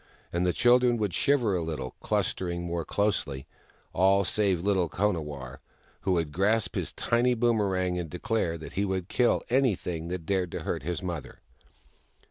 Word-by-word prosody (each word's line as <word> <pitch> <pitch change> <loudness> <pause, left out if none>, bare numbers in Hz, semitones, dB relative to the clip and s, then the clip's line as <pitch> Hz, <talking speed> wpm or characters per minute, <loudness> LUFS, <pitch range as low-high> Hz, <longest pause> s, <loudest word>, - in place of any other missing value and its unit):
And 90 +1 +1
the - - +3
cliildren 120 +3 +4
would 105 -5 -1
shiver 125 -8 +2
a 90 - 0
little, 75 -6 -4
clustering 85 -1 -1
more 85 -1 -2
closely 80 -11 -1 0.3
— - - -35
aU 95 +1 +4
save 95 -2 +1
little 95 -4 +2
Konawarr, 75 -11 -2 0.4
who 95 - 0
would 80 -4 0
grasp 100 +2 +1
his - - -2
tiny 120 +1 +1
boomerang 100 -6 +1
and 85 -2 -4
declare 110 - -1
that 80 - -9
he 100 - 0
would 95 -2 -2
kill 125 -1 +2
anything 95 -10 +1
that 90 -2 -4
dared 95 -2 0
to - - -3
hurt - - -2
his 90 +6 -3
mother. 85 -6 -5
95 Hz, 165 wpm, -28 LUFS, 85-105 Hz, 0.4 s, cliildren